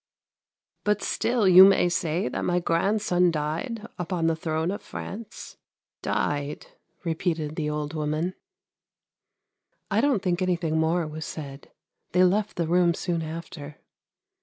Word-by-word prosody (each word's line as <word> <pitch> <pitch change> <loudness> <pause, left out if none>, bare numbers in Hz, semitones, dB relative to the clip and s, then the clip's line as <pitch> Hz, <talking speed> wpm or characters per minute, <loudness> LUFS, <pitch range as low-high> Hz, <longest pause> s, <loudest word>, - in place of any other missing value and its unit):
' - - -68
' - - -56
But 210 -1 +1
still 235 -4 +1
you 185 0 +10
may 195 -2 +6
say 170 -3 0
that 125 - -3
my 175 - +1
grandson 180 +1 +2
died 165 - -3
upon 175 -1 -1
the 165 0 +2
throne 160 +1 -1
of 200 - -5
France. 220 +2 -8 0.4
Died! 145 0 -2 0.2
' - - -42
repeated 160 -2 -2
the 150 -2 -2
old 150 0 -3
woman. 155 +3 -1 1.6
I - - +3
don't 265 -9 +2
think 180 -1 0
anything 170 -3 0
more 165 +1 +1
was 155 +1 -6
said; 140 -3 -8 0.4
they 180 +1 +5
left 205 +3 +2
the 170 - 0
room 175 0 +3
soon 170 -2 -2
after. 155 -2 -7
170 Hz, 145 wpm, -26 LUFS, 155-185 Hz, 1.6 s, you